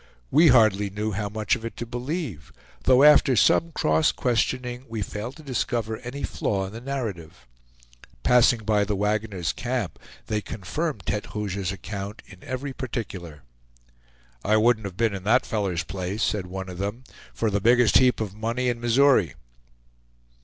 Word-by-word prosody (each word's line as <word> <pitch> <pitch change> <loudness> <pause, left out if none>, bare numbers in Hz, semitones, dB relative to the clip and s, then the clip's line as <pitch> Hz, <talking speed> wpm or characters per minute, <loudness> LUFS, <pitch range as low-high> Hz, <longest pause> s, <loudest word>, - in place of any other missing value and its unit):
We 160 +3 +6
hardly 110 -6 +4
knew 105 +2 -3
how 100 +1 -3
much 110 0 0
of - - -9
it 115 - -6
to 120 - -4
believe, 125 - -5 0.3
though 130 +1 +6
after 145 -3 +6
some 165 +9 +3
cross 160 -1 +2
questioning 125 0 -1
we 110 -2 -3
failed 110 +7 -6
to 155 - -13
discover 120 -5 -2
any 125 +5 -7
flaw 95 -2 -1
in 95 - -8
the 115 - -8
narrative. 100 - -5 0.8
Passing 120 -1 +4
by 105 -1 +2
the 105 0 -1
wagoner's 105 -3 -1
camp, 120 - -3 0.3
they 105 -1 -1
confirmed 110 - -4
Tete 105 +5 -3
Rouge's 100 -3 -2
account 100 +1 -7
in 95 -2 -15
every 135 +2 -4
particular. 95 - -6 1.0
"I 110 +1 +3
wouldn't 110 -1 +3
have 95 -2 -10
been 115 -2 +1
in 95 -2 -6
that 120 +5 +3
feller's 100 -7 -1
place," 95 +3 -4
said 100 -4 -1
one 95 +1 -6
of 90 -1 -8
them, 105 +6 -4 0.3
"for 110 -2 -1
the 100 0 0
biggest 120 +2 +5
heap 125 -1 +3
of 105 -4 -3
money 115 +4 -1
in 120 -1 -3
Missouri." 120 - +3
110 Hz, 165 wpm, -25 LUFS, 100-125 Hz, 1.0 s, We